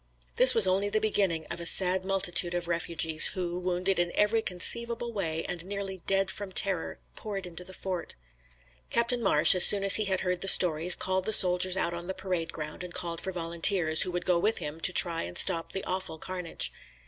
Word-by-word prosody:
This 255 Hz, +1 st, +8 dB
was 225 Hz, -3 st, +8 dB
only 190 Hz, +2 st, -1 dB
the 215 Hz, +1 st, -2 dB
beginning 195 Hz, -7 st, -3 dB
of 170 Hz, -, -8 dB
a 170 Hz, -, -5 dB
sad 185 Hz, +2 st, +4 dB
multitude 180 Hz, -2 st, -1 dB
of 175 Hz, -1 st, -3 dB
refugees, 165 Hz, -2 st, +2 dB
who, 180 Hz, -1 st, -6 dB
wounded 180 Hz, +1 st, -3 dB
in 175 Hz, 0 st, -3 dB
every 215 Hz, +2 st, -1 dB
conceivable 235 Hz, +5 st, -3 dB
way, 165 Hz, -6 st, -5 dB
and 175 Hz, -2 st, -6 dB
nearly 195 Hz, -1 st, -8 dB
dead 195 Hz, 0 st, -1 dB
from 200 Hz, -1 st, -10 dB
terror, 190 Hz, -3 st, 0 dB, 0.2 s
poured 200 Hz, -3 st, -8 dB
into 180 Hz, 0 st, -11 dB
the 185 Hz, -, -11 dB
fort. 185 Hz, -3 st, -8 dB, 0.7 s
Captain 235 Hz, +1 st, -2 dB
Marsh, 150 Hz, -7 st, +4 dB
as 180 Hz, -1 st, +4 dB
soon 200 Hz, -1 st, +7 dB
as 195 Hz, 0 st, +7 dB
he 215 Hz, -, -3 dB
had 190 Hz, -1 st, -3 dB
heard 180 Hz, -1 st, -5 dB
the 195 Hz, -, -5 dB
stories, 175 Hz, -2 st, +5 dB
called 185 Hz, 0 st, -3 dB
the -, -, -4 dB
soldiers 180 Hz, -1 st, +5 dB
out 170 Hz, -2 st, -2 dB
on 170 Hz, 0 st, -9 dB
the 190 Hz, -, -7 dB
parade 180 Hz, -3 st, -6 dB
ground 150 Hz, +2 st, -10 dB
and 180 Hz, -1 st, -12 dB
called 170 Hz, -2 st, -7 dB
for 190 Hz, -, -7 dB
volunteers, 170 Hz, -1 st, 0 dB
who -, -, 0 dB
would 175 Hz, 0 st, -7 dB
go 180 Hz, -2 st, -1 dB
with 215 Hz, +5 st, -2 dB
him 150 Hz, +2 st, -9 dB
to 175 Hz, -, +3 dB
try 170 Hz, -2 st, +3 dB
and 90 Hz, +1 st, -8 dB
stop 165 Hz, 0 st, +1 dB
the 190 Hz, -, -6 dB
awful 185 Hz, -3 st, -7 dB
carnage. 180 Hz, 0 st, -7 dB
180 Hz, 210 wpm, -25 LUFS, 170-195 Hz, 0.7 s, This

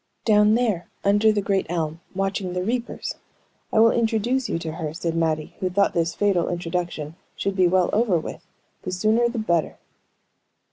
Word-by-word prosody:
"Down 210 Hz, 0 st, +5 dB
there 220 Hz, -8 st, 0 dB, 0.2 s
under 205 Hz, +2 st, +4 dB
the 205 Hz, -1 st, -1 dB
great 195 Hz, -1 st, 0 dB
elm, 165 Hz, -2 st, -2 dB, 0.2 s
watching 195 Hz, -1 st, -2 dB
the 180 Hz, 0 st, -1 dB
reapers. 235 Hz, +4 st, -3 dB, 0.5 s
I -, -, 0 dB
will 225 Hz, +1 st, +7 dB
introduce 235 Hz, +3 st, 0 dB
you -, -, 0 dB
to 165 Hz, -1 st, -4 dB
her," 155 Hz, -1 st, -5 dB
said 170 Hz, -1 st, -2 dB
Mattie, 160 Hz, -2 st, -1 dB
who 185 Hz, -, 0 dB
thought 200 Hz, +2 st, +2 dB
this 170 Hz, 0 st, 0 dB
fatal 195 Hz, -4 st, +1 dB
introduction 175 Hz, -3 st, -3 dB, 0.2 s
should 195 Hz, -1 st, -2 dB
be 185 Hz, -2 st, +4 dB
well 180 Hz, 0 st, +2 dB
over 215 Hz, -5 st, +3 dB
with, 160 Hz, -, -6 dB, 0.4 s
the 185 Hz, -, -5 dB
sooner 220 Hz, +6 st, +2 dB
the 240 Hz, -, -5 dB
better. 170 Hz, -7 st, 0 dB
190 Hz, 175 wpm, -23 LUFS, 170-215 Hz, 0.5 s, will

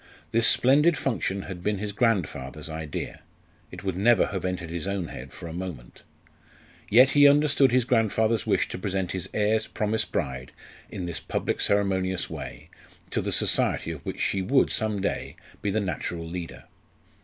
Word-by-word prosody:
This 115 Hz, 0 st, +5 dB
splendid 145 Hz, +5 st, +5 dB
function 100 Hz, -7 st, -2 dB
had 90 Hz, -3 st, -7 dB
been 105 Hz, +2 st, 0 dB
his 105 Hz, +1 st, -4 dB
grandfather's 80 Hz, -, -1 dB
idea; 80 Hz, -2 st, -5 dB, 0.5 s
it -, -, -10 dB
would 95 Hz, -3 st, -2 dB
never 110 Hz, +5 st, +4 dB
have 95 Hz, -3 st, -4 dB
entered 90 Hz, -3 st, -3 dB
his 85 Hz, +1 st, -3 dB
own 100 Hz, -4 st, -2 dB
head -, -, -9 dB
for -, -, -10 dB
a 80 Hz, -, -7 dB
moment. 85 Hz, -9 st, -7 dB, 0.9 s
Yet 130 Hz, +5 st, +6 dB
he 145 Hz, 0 st, +7 dB
understood 140 Hz, -2 st, +4 dB
his 125 Hz, -1 st, +3 dB
grandfather's 115 Hz, -3 st, +1 dB
wish -, -, +2 dB
to -, -, -6 dB
present 95 Hz, -1 st, -2 dB
his 95 Hz, -3 st, -4 dB
heir's 110 Hz, +1 st, +1 dB
promised 110 Hz, +1 st, -2 dB
bride 65 Hz, -4 st, -3 dB, 0.4 s
in 90 Hz, -, -5 dB
this 85 Hz, -2 st, -3 dB
public -, -, -2 dB
ceremonious 95 Hz, -2 st, +1 dB
way -, -, -8 dB, 0.4 s
to -, -, 0 dB
the -, -, -2 dB
society -, -, +1 dB
of -, -, -8 dB
which -, -, -5 dB
she 95 Hz, -, 0 dB
would 130 Hz, +8 st, +2 dB
some 110 Hz, -2 st, 0 dB
day 100 Hz, -, -3 dB, 0.3 s
be 105 Hz, -, -1 dB
the 105 Hz, +2 st, +1 dB
natural 85 Hz, -3 st, -3 dB
leader. 85 Hz, 0 st, -7 dB
100 Hz, 170 wpm, -26 LUFS, 90-115 Hz, 0.9 s, he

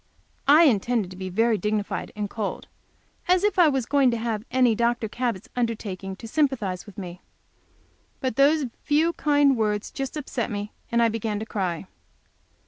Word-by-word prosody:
I 300 Hz, +4 st, +8 dB
intended 230 Hz, -, +2 dB
to -, -, -9 dB
be 185 Hz, 0 st, -5 dB
very 225 Hz, +3 st, +2 dB
dignified 210 Hz, -1 st, -2 dB
and 210 Hz, -1 st, -2 dB
cold. 210 Hz, 0 st, -4 dB, 0.6 s
As 365 Hz, +1 st, +3 dB
if 415 Hz, -3 st, +1 dB
I 345 Hz, -, +7 dB
was 265 Hz, -4 st, 0 dB
going 275 Hz, 0 st, +3 dB
to 235 Hz, -, 0 dB
have 225 Hz, -2 st, -2 dB
any 250 Hz, -2 st, +3 dB
Dr. 235 Hz, 0 st, 0 dB
Cabot's 235 Hz, -3 st, -3 dB
undertaking 210 Hz, -5 st, -3 dB
to 225 Hz, -, -10 dB
sympathize 225 Hz, -, -1 dB
with 205 Hz, -, -13 dB
me! 180 Hz, -2 st, -7 dB, 1.0 s
But 260 Hz, -5 st, -2 dB
those 285 Hz, +2 st, +4 dB, 0.2 s
few 315 Hz, +3 st, +2 dB
kind 290 Hz, -3 st, +3 dB
words 210 Hz, -2 st, -1 dB
just 270 Hz, +2 st, -4 dB
upset 260 Hz, -5 st, -3 dB
me, 205 Hz, -1 st, -4 dB, 0.2 s
and 235 Hz, 0 st, +3 dB
I 230 Hz, -, +4 dB
began 220 Hz, -1 st, -2 dB
to 215 Hz, -, -4 dB
cry. 185 Hz, -5 st, -3 dB
230 Hz, 170 wpm, -25 LUFS, 205-270 Hz, 1.0 s, I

